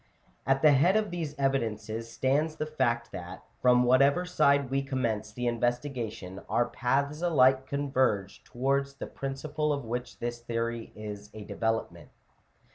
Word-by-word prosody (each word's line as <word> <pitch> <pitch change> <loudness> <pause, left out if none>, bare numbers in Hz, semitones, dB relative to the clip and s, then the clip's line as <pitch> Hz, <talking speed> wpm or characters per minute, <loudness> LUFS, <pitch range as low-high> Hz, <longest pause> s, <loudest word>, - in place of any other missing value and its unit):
At 135 +1 +2
the 155 - +8
head 145 +8 +4
of 215 -3 -1
these 160 -4 -4
evidences 115 -4 -1
stands 145 +6 +1
the 155 - -2
fact 120 -6 -1
that, 90 +1 -8 0.2
from 125 0 +5
whatever 140 +7 +4
side 140 -6 +3
We 135 0 +1
commence 120 -6 -2
the 125 +3 -4
investigation, 120 -5 -2
our 120 - +2
paths 140 +6 0
alike 135 -6 +4
converge 130 -9 0
towards 140 +2 -1
the - - -6
principle 150 +3 -3
of 140 -4 -2
which 120 +2 -4
this 120 0 -4
theory 115 0 -3
is 105 -1 -7
a 110 - -7
deve - - -9
lopment. 110 -1 -1
130 Hz, 150 wpm, -29 LUFS, 115-140 Hz, 0.2 s, the